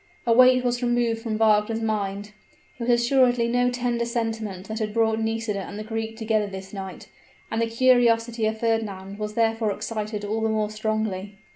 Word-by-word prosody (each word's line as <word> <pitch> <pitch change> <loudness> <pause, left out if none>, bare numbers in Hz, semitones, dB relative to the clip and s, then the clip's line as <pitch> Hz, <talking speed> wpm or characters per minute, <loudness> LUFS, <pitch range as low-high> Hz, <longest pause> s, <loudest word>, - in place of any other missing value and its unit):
A 235 - +4
weight 255 +1 +6
was 245 0 0
removed 240 -2 +1
from 225 -2 -2
Wagner's 220 0 +3
mind: 205 -2 -2 0.4
it - - -14
was 235 - -2
assuredly 245 0 +3
no 245 +1 +2
tender 245 -1 -1
sentiment 225 -5 -3
that 220 +1 -4
had 215 -1 -3
brought 220 -1 +2
Nisida 225 -2 -2
and 200 - -7
the 215 - -5
Greek 225 0 -4
together 220 -2 0
this 190 0 -8
night; 190 -2 -7 0.4
and 225 - 0
the 230 - +1
curiosity 230 -1 +3
of 220 0 -2
Fernand 205 -4 -2
was 210 0 -4
therefore 225 -1 +1
excited 210 0 -4
all 220 +2 -2
the 220 - +1
more 215 -1 0
strongly. 215 -2 -3
225 Hz, 180 wpm, -24 LUFS, 210-235 Hz, 0.4 s, weight